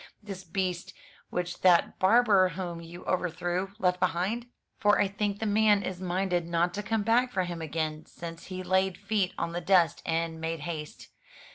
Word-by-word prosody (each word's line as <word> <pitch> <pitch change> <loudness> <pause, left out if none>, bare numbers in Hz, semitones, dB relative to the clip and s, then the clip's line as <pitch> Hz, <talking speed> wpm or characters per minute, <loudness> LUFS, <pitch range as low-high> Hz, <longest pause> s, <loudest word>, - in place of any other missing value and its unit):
This 195 -2 -7
beast 185 +1 -3 0.3
which 180 0 -3
that 180 -2 +4
barber 200 -2 +5
whom 175 -1 -5
you 170 +1 -10
overthrew 180 +1 -1
left 180 -4 +1
behind? 185 +6 0 0.3
For 205 -1 +4
I 205 - +4
think 200 0 -2
the 220 - -3
man 210 -1 +4
is 185 -1 -5
minded 180 -1 0
not 170 +1 +1
to 205 - -3
come 215 +1 -1
back 245 +3 +3
for 190 -6 0
him 175 -2 -5
again, 155 0 -3
since 165 -1 -9
he 185 0 -5
laid 190 0 +1
feet 200 -2 0
on 170 - -2
the 175 +1 -3
dust 175 -1 +3
and 165 0 -2
made 165 -1 -3
haste. 155 -1 -6
185 Hz, 175 wpm, -29 LUFS, 170-200 Hz, 0.3 s, barber